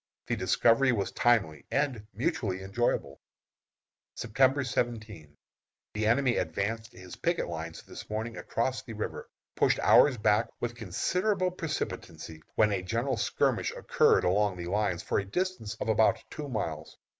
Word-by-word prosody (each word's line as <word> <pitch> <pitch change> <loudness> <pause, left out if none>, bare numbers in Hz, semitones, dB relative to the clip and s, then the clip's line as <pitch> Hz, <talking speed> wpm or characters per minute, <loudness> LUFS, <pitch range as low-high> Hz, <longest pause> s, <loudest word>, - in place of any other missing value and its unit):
The 120 - -1
discovery 115 +6 +3
was 100 -5 -1
timely, 95 - +1
and 135 -7 -1
mutually 110 - -1
enjoyable. 95 -9 -1 0.9
September 135 +4 +2
17. 105 - -3 0.6
The 105 0 0
enemy 120 +2 +3
advanced 110 +7 -2
his 90 0 -10
picket 170 0 0
lines 80 -1 -6
this - - -10
morning 110 +2 -3
across 130 +3 -2
the 125 -4 -9
river, 105 - -5 0.3
pushed - - +3
ours 140 -4 +6
back 105 +1 +3
with 120 -1 -2
considerable 180 - 0
precipitancy, 150 - -5
when 105 -1 +4
a 95 -2 0
general 115 +7 -1
skirmish 110 - 0
occurred - - +3
along 100 +1 +2
the 85 - -5
lines 100 -4 0
for - - 0
a - - -2
distance 180 - -3
of - - -3
about 110 +1 +3
two 150 -2 -6
miles. 80 - -4
110 Hz, 145 wpm, -29 LUFS, 95-130 Hz, 0.9 s, ours